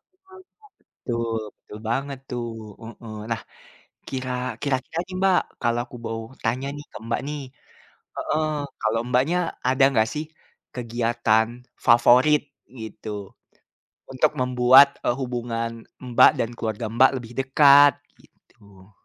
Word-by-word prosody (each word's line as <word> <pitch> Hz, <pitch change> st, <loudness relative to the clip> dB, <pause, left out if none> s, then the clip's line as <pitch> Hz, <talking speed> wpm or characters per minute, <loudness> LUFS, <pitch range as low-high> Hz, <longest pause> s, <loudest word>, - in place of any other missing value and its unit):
Heeh. 375 Hz, 0 st, -19 dB, 0.7 s
Betul 115 Hz, -2 st, -1 dB, 0.2 s
betul 105 Hz, -, -12 dB
banget 135 Hz, +3 st, -2 dB
tuh 120 Hz, -1 st, -3 dB, 0.4 s
heeh. 115 Hz, -1 st, -10 dB, 0.2 s
Nah, 115 Hz, 0 st, -1 dB, 0.7 s
kira, 130 Hz, -1 st, -4 dB, 0.3 s
kira-kira 140 Hz, +3 st, -2 dB
nih 185 Hz, -, -9 dB
Mbak, 190 Hz, -2 st, +4 dB, 0.2 s
kalau 120 Hz, 0 st, +1 dB
aku 125 Hz, -, -12 dB
mau 115 Hz, 0 st, -3 dB, 0.2 s
tanya 125 Hz, +4 st, -1 dB
nih 145 Hz, -, -9 dB
ke -, -, -8 dB
Mbak 115 Hz, -, -1 dB
nih, 150 Hz, -1 st, -4 dB, 0.8 s
heeh, 155 Hz, 0 st, -1 dB, 0.3 s
kalau 110 Hz, +1 st, 0 dB
Mbaknya 130 Hz, +8 st, +2 dB, 0.3 s
ada 130 Hz, +1 st, +4 dB
nggak 110 Hz, -2 st, +2 dB
sih, 150 Hz, +1 st, -3 dB, 0.5 s
kegiatan 115 Hz, -2 st, +1 dB, 0.4 s
favorit 125 Hz, +5 st, +5 dB, 0.4 s
gitu, 110 Hz, 0 st, -8 dB, 1.0 s
untuk 145 Hz, +4 st, +1 dB
membuat, 125 Hz, +2 st, +6 dB, 0.2 s
e -, -, +2 dB
hubungan 120 Hz, -2 st, -3 dB, 0.4 s
Mbak -, -, +8 dB
dan 115 Hz, -, -1 dB
keluarga 110 Hz, 0 st, -3 dB
Mbak 130 Hz, +1 st, +6 dB
lebih 120 Hz, 0 st, -11 dB
dekat, 140 Hz, +1 st, +6 dB, 0.3 s
gitu. 100 Hz, -1 st, -22 dB
125 Hz, 125 wpm, -24 LUFS, 115-140 Hz, 1.0 s, Mbak